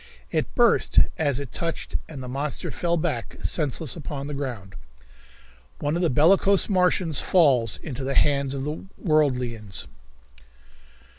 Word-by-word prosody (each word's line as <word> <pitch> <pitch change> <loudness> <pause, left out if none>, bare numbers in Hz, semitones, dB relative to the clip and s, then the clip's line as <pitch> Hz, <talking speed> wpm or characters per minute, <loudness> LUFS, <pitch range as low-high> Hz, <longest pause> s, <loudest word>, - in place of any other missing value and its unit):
It - - -2
burst - - +3 0.2
as 145 -4 +1
it 140 -4 -7
touched 165 -1 -3
and 140 -5 -7
the - - -7
monster 140 +3 -3
fell 170 -1 -1
back 120 -7 -3
senseless 150 -1 0
upon 145 -3 -6
the 145 - -5
ground. 120 -9 -5 1.0
One 145 +2 -1
of 175 - -1
the 170 - +2
Bellicose 190 +8 +4
Martians 180 -5 +2
Falls 130 - +3
Into 135 -3 -5
the 135 +1 -2
Hands 140 -2 +2
of 135 - -4
the 150 +2 -4
Worldians. 125 - 0
145 Hz, 140 wpm, -24 LUFS, 130-160 Hz, 1.0 s, Bellicose